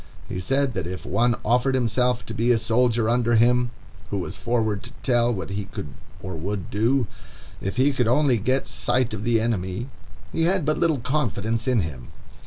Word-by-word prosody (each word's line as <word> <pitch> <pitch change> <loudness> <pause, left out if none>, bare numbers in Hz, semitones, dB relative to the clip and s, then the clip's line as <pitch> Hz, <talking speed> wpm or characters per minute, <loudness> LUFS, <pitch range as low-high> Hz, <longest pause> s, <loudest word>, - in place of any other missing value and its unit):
'" - - -20
He 90 - -2
said 135 +7 0
that 85 - -3
if 95 +1 -6
one 120 +4 +2
offered 125 +3 +2
himself 125 0 +1
to 110 - -6
be 115 +3 +2
a 120 - +4
soldier 115 0 +2
under 120 0 +2
him, 120 +2 +4 0.4
who 100 - -2
was 90 - -4
forward 110 -4 0
to 120 - -9
tell 120 -1 +3
what 100 -3 -4
he 100 0 -3
could 75 - -7 0.3
or 95 -2 -5
would 95 +3 -4
do, 120 +5 +2 0.6
if 100 - -3
he 140 +3 +4
could 125 -3 +1
only 130 -1 +3
get 130 +6 +1
sight 120 0 0
of 105 -1 -4
the 115 0 +3
enemy, 110 +1 -2 0.4
he 165 - +1
had 180 -2 +2
but 155 0 +1
little 165 -3 +3
confidence 115 -3 -1
in 125 -4 +3
him. 70 -7 -6
120 Hz, 195 wpm, -24 LUFS, 105-125 Hz, 0.6 s, a